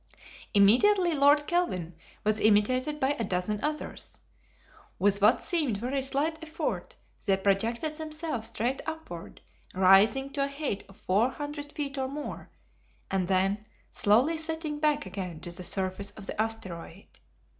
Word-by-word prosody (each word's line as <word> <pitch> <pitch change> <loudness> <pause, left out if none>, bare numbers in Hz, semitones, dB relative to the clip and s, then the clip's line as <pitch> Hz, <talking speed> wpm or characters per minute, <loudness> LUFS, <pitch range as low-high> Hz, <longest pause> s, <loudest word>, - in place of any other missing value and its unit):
Immediately 340 - +5
Lord 290 +1 +5
Kelvin 185 - -1 0.3
was 215 0 +1
imitated 255 +8 +2
by 265 - +2
a - - 0
dozen 195 +2 -2
others. 300 0 -4 0.8
With 200 +1 +2
what 215 +5 +5
seemed 305 - +1
very 255 +6 -2
slight 285 +4 -1
effort 320 0 -4 0.3
they 195 -1 +4
projected 225 +10 0
themselves 310 -6 -3
straight 240 +3 -2
upward, 315 - -7 0.3
rising 205 +9 +5
to 275 -1 0
a - - -2
height 280 -7 -3
of 195 - -16
four 210 +7 +2
hundred 290 +1 -6
feet 280 -2 -3
or 265 - 0
more, 290 +2 -6 0.6
and 190 -2 0
then 195 +2 +1 0.3
slowly 250 +11 +3
settling 320 -2 -3
back 300 -1 +1
again 185 -4 -5
to 175 - -6
the 180 +1 -6
surface 190 +2 -1
of 205 0 -6
the 210 - -2
asteroid. 195 -5 -5
240 Hz, 145 wpm, -28 LUFS, 195-295 Hz, 0.8 s, Immediately